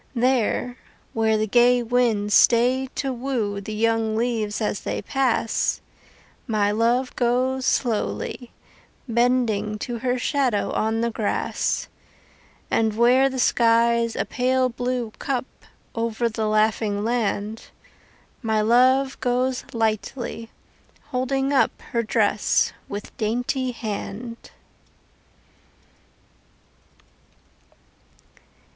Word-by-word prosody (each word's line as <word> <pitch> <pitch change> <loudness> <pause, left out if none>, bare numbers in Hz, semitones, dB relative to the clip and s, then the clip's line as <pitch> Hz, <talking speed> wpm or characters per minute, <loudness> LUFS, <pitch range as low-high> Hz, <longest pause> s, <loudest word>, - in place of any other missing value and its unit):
There, 245 0 +1 0.4
where 220 -1 +2
the 215 - +1
gay 245 +2 +4
winds 225 -4 +1
stay 250 +4 +4
to 270 -2 -2
woo 235 -6 -2
The 215 +2 -6
young 225 0 +1
leaves 225 -3 -1
as 210 -2 -2
they - - -4
pass, 255 -4 0 0.7
My 210 -3 +1
love 235 +4 +1
goes 255 +2 +1
slowly, 240 +1 -1 0.6
bending 230 -3 +1
to 235 +2 -5
Her 250 +1 0
shadow 255 -5 0
on 220 +1 0
the 235 0 0
grass; 220 -2 -1 0.8
And 220 -1 +1
where 255 +3 +5
the 265 - -5
sky's 235 -1 +3
a - - -1
pale 255 0 +1
blue 245 -1 -3
cup 260 -3 -2 0.5
Over 230 0 -1
the 220 -1 -2
laughing 215 -1 +1
land, 220 -2 -2 0.8
My 220 -3 0
love 255 +5 +3
goes 255 +1 0
lightly, 225 +1 -2 0.6
holding 270 +2 -1
up 270 - +2
Her 235 - +1
dress 220 - +1 0.2
with 205 0 -7
dainty 245 +4 -1
hand. 230 +1 -6
235 Hz, 100 wpm, -23 LUFS, 220-250 Hz, 0.8 s, where